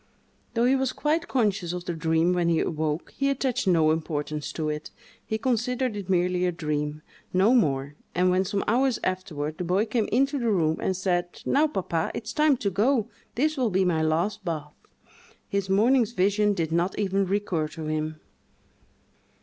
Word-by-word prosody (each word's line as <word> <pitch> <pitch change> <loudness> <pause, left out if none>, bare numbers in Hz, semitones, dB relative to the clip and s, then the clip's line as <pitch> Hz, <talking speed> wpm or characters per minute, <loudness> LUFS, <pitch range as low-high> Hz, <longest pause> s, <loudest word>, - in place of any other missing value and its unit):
Though 230 +1 +3
he 260 +2 +4
was 265 -1 0
quite 315 +3 0
conscious 200 -8 0
of 180 0 -5
the 175 - -2
dream 160 +2 +2
when 175 -1 +1
he 165 -1 +2
awoke, 155 0 -2
he 275 0 +1
attached 260 -4 -1
no 160 -4 +4
importance 155 -2 -3
to 155 -2 -2
it; 150 0 -4 0.3
he 220 - -2
considered 250 0 0
it 200 -2 -6
merely 180 0 +2
a - - +1
dream—no 155 +6 -1
more; 140 - +1 0.2
and 180 +1 +3
when, 185 +1 +3
some 200 +1 -1
hours 250 +2 +2
afterward, 155 -5 -3
the - - -1
boy 185 +5 +1
came 220 -1 0
into 275 +2 +2
the 235 -2 0
room, 160 -6 +2
and 190 - -1
said, 175 -2 -1
"Now, 300 +3 +3
papa, 175 - -2
it's 225 0 -5
time 300 -3 +3
to 200 -4 -1
go—this 240 - 0
will 250 -4 +1
be 190 -1 +2
my 165 -3 +1
last 170 +7 0
bath"—his 170 +4 -7
morning's 230 +4 +3
vision 205 +1 +2
did 165 -3 -2
not 175 +3 0
even 195 -1 +1
recur 185 -5 0
to 160 +1 -8
him. 155 0 -3
185 Hz, 175 wpm, -26 LUFS, 160-230 Hz, 0.3 s, he